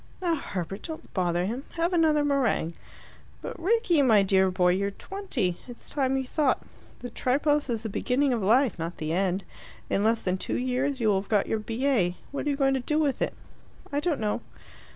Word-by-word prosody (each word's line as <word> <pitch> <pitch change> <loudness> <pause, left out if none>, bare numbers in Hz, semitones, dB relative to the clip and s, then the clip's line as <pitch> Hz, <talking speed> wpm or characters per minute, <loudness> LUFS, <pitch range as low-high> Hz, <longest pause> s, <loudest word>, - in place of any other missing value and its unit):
"Now, 350 -2 +1
Herbert, 195 - -4
don't 320 -2 -8
bother 175 -1 +1
him. 240 +7 -3
Have 340 +2 0
another 310 -3 +3
meringue." 265 - +1 0.7
"But, - - -6
Rickie, 365 -3 +3
my 220 -7 +5
dear 190 -1 +3
boy, 180 -1 +2
you're 200 +2 0
twenty. 240 - -3
It's 245 -1 -11
time 270 -2 +1
you 265 - -2
thought. 280 +1 +1 0.4
The 245 - -6
Tripos 290 +4 +1
is 225 -2 -1
the 220 - -3
beginning 260 +6 +1
of 230 - -1
life, 225 +1 +3
not 165 +2 -4
the 155 +1 -2
end. 190 +1 0 0.5
In 200 - +2
less 225 +1 +2
than 185 0 0
two - - -2
years 255 +2 -1
you 225 -2 +2
will 195 -2 +2
have 195 - -15
got 210 -3 +3
your 220 - -1
B.A. 225 -5 0
What 285 - -3
are - - +3
you 285 - +1
going 270 -1 +3
to 265 - +1
do 300 +5 -1
with 295 -4 +1
it?" - - -1 0.6
"I 285 - +1
don't 305 -2 0
know." 215 +1 -1
250 Hz, 205 wpm, -27 LUFS, 195-285 Hz, 0.7 s, my